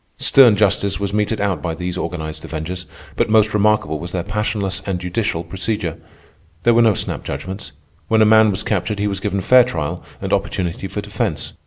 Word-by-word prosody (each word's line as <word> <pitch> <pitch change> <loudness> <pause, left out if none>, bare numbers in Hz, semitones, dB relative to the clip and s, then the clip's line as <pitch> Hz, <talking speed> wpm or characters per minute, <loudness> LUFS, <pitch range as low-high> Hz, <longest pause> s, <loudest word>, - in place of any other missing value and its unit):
Stern 125 -6 +6
justice 100 -1 +1
was 100 -1 -2
meted 105 +1 0
out 100 -6 -1
by 85 -2 -3
these 90 +1 -4
organized 80 -4 -5
avengers, 85 +3 -5 0.3
but - - +1
most 110 0 +4
remarkable 105 -7 +2
was 85 +2 -7
their 90 -2 -1
passionless 105 -1 -2
and 95 -2 -1
judicial 90 -1 -2
procedure. 90 -1 -3 0.7
There 120 - +5
were 115 - +5
no 110 -3 +4
snap - - -3
judgments. 95 +2 -6 0.4
When 110 -1 +4
a - - +5
man 110 0 +6
was 100 0 -1
captured 105 +1 -1
he 100 - -1
was 100 -2 -1
given 100 -1 -2
fair 125 +5 +6
trial 80 -12 -4 0.2
and - - -3
opportunity 90 +1 -1
for 100 +2 -4
defence. 105 -1 -3
100 Hz, 190 wpm, -19 LUFS, 90-105 Hz, 0.7 s, Stern